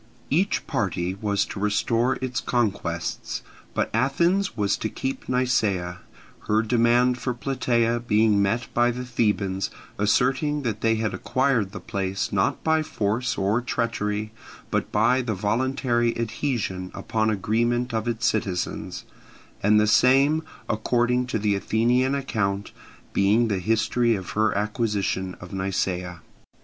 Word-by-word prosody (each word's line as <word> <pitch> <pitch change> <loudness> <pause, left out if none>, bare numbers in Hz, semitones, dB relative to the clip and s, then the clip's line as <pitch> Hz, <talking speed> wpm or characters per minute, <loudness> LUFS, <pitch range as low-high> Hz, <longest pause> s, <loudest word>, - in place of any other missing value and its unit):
Each 185 +8 +1
party 90 -4 -1
was 100 0 0
to - - -7
restore 115 +5 +1
its 125 -1 -1
conquests, 100 -8 -2 0.3
but - - 0
Athens 155 - +1
was 100 -1 +2
to 110 - -3
keep 135 +4 -4
Nisaea; 105 -9 0 0.5
her 110 +1 +3
demand 120 +2 +3
for 125 0 -2
Plataea 120 -2 0
being 110 -3 +3
met 115 +5 +1
by 120 0 +3
the 125 +1 -4
Thebans 105 -6 0 0.3
asserting 135 +8 +2
that 110 -3 -2
they 115 0 +3
had 110 -2 -1
acquired 120 0 0
the 100 - -7
place 95 +1 -3
not 95 -1 +1
by 160 0 +3
force 125 -3 -1
or 100 +5 +1
treachery, 110 -3 -2 0.4
but - - -1
by 120 +5 +3
the 115 -4 -2
voluntary 120 +3 0
adhesion 110 -5 -2
upon 110 -1 0
agreement 120 +4 0
of 110 +1 -1
its 115 0 -1
citizens; 100 -6 -2 0.6
and 105 +1 +4
the 105 - +4
same, 135 +8 +4 0.3
according 120 +3 +1
to 125 - -1
the 105 -1 +1
Athenian 120 +6 +1
account, 100 -7 -2 0.4
being 110 +4 +3
the 100 -3 0
history 115 +3 +2
of 95 -3 -6
her 110 0 +2
acquisition 105 -3 -1
of 90 +1 -10
Nisaea. 90 -2 -2
110 Hz, 135 wpm, -25 LUFS, 100-125 Hz, 0.6 s, and